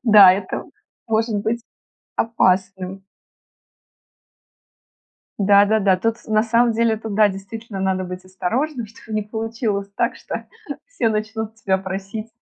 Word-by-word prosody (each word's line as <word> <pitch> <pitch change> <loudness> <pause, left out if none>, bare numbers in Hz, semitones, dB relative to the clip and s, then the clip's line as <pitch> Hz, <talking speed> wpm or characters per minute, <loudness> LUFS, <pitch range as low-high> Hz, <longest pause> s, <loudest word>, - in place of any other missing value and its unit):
Да, 205 -5 +9
это 190 0 -3 0.4
может 225 -1 +1
быть 225 +3 -1 0.5
опасным. 190 -3 +1 2.3
Да-да-да. 200 -1 +5
Тут 225 +4 -1
с - - -21
на 215 0 +3
самом 235 +1 +3
деле 225 0 +2
тут, 220 -1 -6
да, 210 0 +5
действительно 195 +1 -7
надо 190 -1 0
быть 180 +1 -7
осторожным, 230 - -2
чтобы 220 0 -7
не 215 - 0
получилось 220 -2 -3
так, - - +1
что - - -6 0.4
все - - 0
начнут 220 0 -3
тебя 190 -3 +1
просить 195 +3 -5
215 Hz, 125 wpm, -21 LUFS, 195-225 Hz, 2.3 s, Да